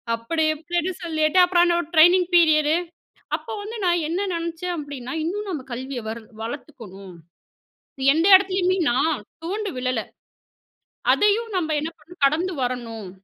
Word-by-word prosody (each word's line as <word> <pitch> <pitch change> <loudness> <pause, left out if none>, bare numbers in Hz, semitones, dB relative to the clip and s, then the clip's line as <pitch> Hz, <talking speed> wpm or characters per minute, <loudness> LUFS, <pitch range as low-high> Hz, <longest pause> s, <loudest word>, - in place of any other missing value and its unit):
அப்படி 230 +8 -2
இப்படின்னு 345 +3 -2
சொல்லிட்டு, 315 +1 +1
அப்புறம் 350 -1 +3
என்னோட 345 -2 +1
ட்ரெய்னிங் 350 +3 +6
பீரியடு, 310 -2 +4 0.6
அப்ப - - -20
வந்து 435 +3 -7
நான் 345 -2 +2
என்ன 380 +5 -1
நெனச்சேன்? 335 +1 -3
அப்டின்னா, 285 -3 -6
இன்னும் 395 +5 -3
நம்ம 300 -8 -4
கல்விய 260 +1 -5
வர் 230 +1 -6 0.2
வளர்த்துக்கணும். 210 - -9 1.0
எந்த 325 +2 +1
இடத்துலயுமே 375 -1 +2
நான் 275 0 0 0.2
துவண்டு 405 +3 -3
விழல. 255 -2 -1 1.1
அதையும் 425 +3 +1
நம்ம 320 -3 0
என்ன 315 +2 -4
பண்ணணும்? 315 +1 -17
கடந்து 340 +6 0
வரணும். 230 -5 -4
320 Hz, 130 wpm, -23 LUFS, 265-360 Hz, 1.1 s, ட்ரெய்னிங்